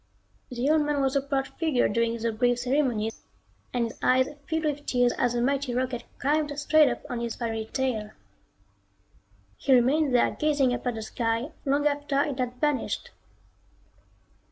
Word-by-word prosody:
The 250 +1 -2
old 310 +1 +4
man 295 -1 0
was 270 0 +1
a 275 - +3
proud 275 -1 -1
figure 310 -7 +2
during 230 +2 0
the 230 0 -1
brief 245 +2 +1
ceremonies 245 -4 0 0.5
and 245 -1 0
his 230 - -8
eyes 260 +1 +3 0.2
filled 320 0 -1
with 290 -1 -2
tears 245 -1 +2
as 245 -1 0
the 240 0 0
mighty 275 -1 0
rocket 250 -1 -2
climbed 295 +1 0
straight 305 +1 +4
up - - -4
on 240 -1 -4
its 235 -1 -3
fiery 225 -2 -3
tail. 250 -6 -1 1.5
He 270 - +3
remained 265 +3 +3
there 245 - +4
gazing 285 -4 +1
up 245 - -4
at 245 - 0
the 220 - -5
sky 230 +5 -2
long 285 +1 +1
after 290 -1 0
it 280 -3 -4
had 250 -1 -2
vanished. 295 -3 -1
260 Hz, 170 wpm, -27 LUFS, 240-290 Hz, 1.5 s, old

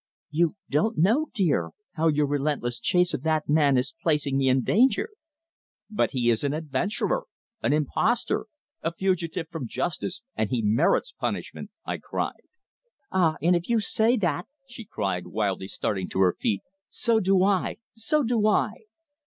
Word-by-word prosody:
"You 165 +2 +2
don't 190 +11 +1
know, 230 - +3
dear, 145 - +1 0.2
how 165 0 0
your 150 -1 +3
relentless 140 -4 -1
chase 180 +8 +2
of - - -2
that 155 0 0
man 145 -3 +4
is 125 +2 -1
placing 150 -4 +1
me 135 -1 +3
in 130 0 +3
danger." 265 - +3 0.8
"But 210 - +1
he 120 -3 +2
is 115 - 0
an 140 0 0
adventurer, 160 - -1 0.3
an - - +1
impostor 155 - +1 0.3
a 165 - -1
fugitive 175 -3 -1
from 150 -7 -4
justice, 175 - -3
and 110 - 0
he 125 -3 -1
merits 105 - +2
punishment!" - - -4 0.2
I - - -3
cried. - - -4 0.7
"Ah! 170 -4 +2
And 175 +2 +4
if 175 +3 -2
you 235 -1 +3
say 225 +3 +2
that," 175 -5 -1 0.2
she 240 -3 -10
cried, 95 - -3
wildly 95 -1 -1
starting 95 -1 -2
to - - -3
her 90 -2 +4
feet. 100 -2 -1 0.3
"So 230 -2 +1
do 190 -2 +3
I! 195 -1 +1 0.2
So 230 +7 0
do 225 -3 +2
I!" 215 0 +3
160 Hz, 160 wpm, -26 LUFS, 130-205 Hz, 0.8 s, man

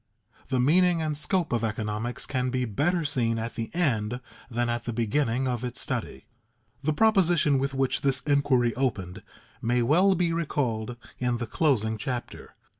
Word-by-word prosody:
The 130 -1 0
meaning 170 +6 +4
and 155 -2 -1
scope 170 0 0
of 115 -1 0
economics 110 +2 -3
can 130 -1 -1
be 125 0 -1
better 155 - 0
seen 115 -5 +1
at 115 +1 -4
the 115 -1 -4
end 125 -9 0 0.3
than 120 0 -1
at 120 0 -2
the 120 - -3
beginning 120 +3 0
of 125 -1 -2
its 125 0 -3
study. 125 -4 -3 0.6
The 150 +2 +1
proposition 175 -7 +3
with 135 0 -2
which 135 -1 0
this 135 -2 +2
inquiry 135 -5 +2
opened 105 -7 -2 0.4
may 120 +1 +1
well 180 +10 +4
be 170 -1 +1
recalled 125 -8 -2 0.2
in 125 -1 0
the 120 - -3
closing 110 -5 +1
chapter. 125 +2 -5
125 Hz, 165 wpm, -27 LUFS, 115-150 Hz, 0.6 s, meaning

